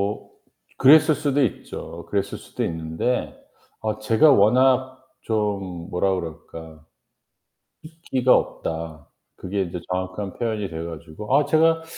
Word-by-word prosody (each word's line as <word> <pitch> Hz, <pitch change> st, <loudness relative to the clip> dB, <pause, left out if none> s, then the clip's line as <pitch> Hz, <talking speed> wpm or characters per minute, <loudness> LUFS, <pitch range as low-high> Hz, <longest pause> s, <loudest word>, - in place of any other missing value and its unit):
어 -, -, -17 dB, 0.5 s
그랬을 155 Hz, +3 st, +6 dB
수도 145 Hz, -1 st, +1 dB
있죠. 120 Hz, -, -5 dB
그랬을 100 Hz, -1 st, -2 dB
수도 -, -, -6 dB
있는데 80 Hz, +9 st, -2 dB, 0.5 s
어 110 Hz, 0 st, -2 dB
제가 115 Hz, +8 st, +4 dB
워낙 130 Hz, +3 st, +3 dB, 0.2 s
좀 100 Hz, -5 st, -3 dB
뭐라 95 Hz, +1 st, +1 dB
그럴까. 80 Hz, -2 st, -8 dB, 1.0 s
"숫기가 135 Hz, -6 st, +1 dB
없다." 80 Hz, -2 st, -3 dB, 0.3 s
그게 100 Hz, +2 st, -3 dB
인제 90 Hz, 0 st, -6 dB
정확한 95 Hz, +2 st, -3 dB
표현이 110 Hz, -4 st, -3 dB
돼 80 Hz, 0 st, -5 dB
가지고 85 Hz, -, -2 dB
아 145 Hz, -, +3 dB
제가 165 Hz, +2 st, +3 dB
105 Hz, 245 characters per minute, -23 LUFS, 85-130 Hz, 1.0 s, 그랬을